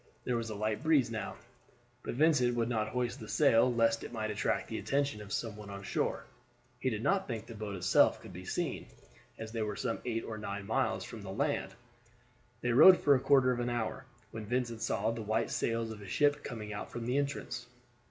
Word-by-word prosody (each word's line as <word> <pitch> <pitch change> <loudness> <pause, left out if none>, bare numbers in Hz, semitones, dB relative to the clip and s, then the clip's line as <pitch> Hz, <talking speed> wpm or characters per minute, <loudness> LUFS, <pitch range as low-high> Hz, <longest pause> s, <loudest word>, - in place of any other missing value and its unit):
There 125 - 0
was 115 -1 -2
a 110 - -4
light 110 +2 -1
breeze 150 -7 +3
now, 110 -2 -4 0.7
but - - -5
Vincent 130 -4 +3
would 115 -1 +1
not 110 -3 0
hoist 125 +3 -2
the 110 - -8
sail 115 +3 +4
lest 115 -1 +2
it - - -7
might 110 -2 -2
attract 105 - -1
the - - -4
attention 140 -6 0
of 105 0 -10
some 110 -1 -2
one 105 -1 -10
on 100 0 -7
shore. - - -1 0.5
He 130 - 0
did 110 -2 -3
not 195 0 +2
think 115 -3 -4
the 115 - -9
boat 105 -2 -5
itself 90 -1 +4
could - - -11
be - - -8
seen, - - -3 0.5
as 110 0 -7
they 115 -1 -3
were 105 -1 -2
some 115 +1 -2
eight 115 -2 -2
or 110 -1 -5
nine 100 -1 -5
miles 110 0 0
from 115 - -8
the 100 - -8
land. - - -1 0.9
They 120 - 0
rowed 160 +9 +9
for 145 - +5
a 130 - +4
quarter 130 -1 +4
of 125 - -1
an 120 0 -1
hour, 120 -2 -2 0.3
when 110 -1 -7
Vincent 120 -1 -1
saw 110 +1 0
the 115 0 -4
white 110 +2 0
sails 115 -1 -1
of 105 -1 -8
a 100 - -9
ship 145 +8 +2
coming 105 -4 -6
out 100 - -5
from 120 -1 -5
the 125 +4 +1
entrance. 140 0 -3
115 Hz, 220 wpm, -32 LUFS, 110-125 Hz, 0.9 s, rowed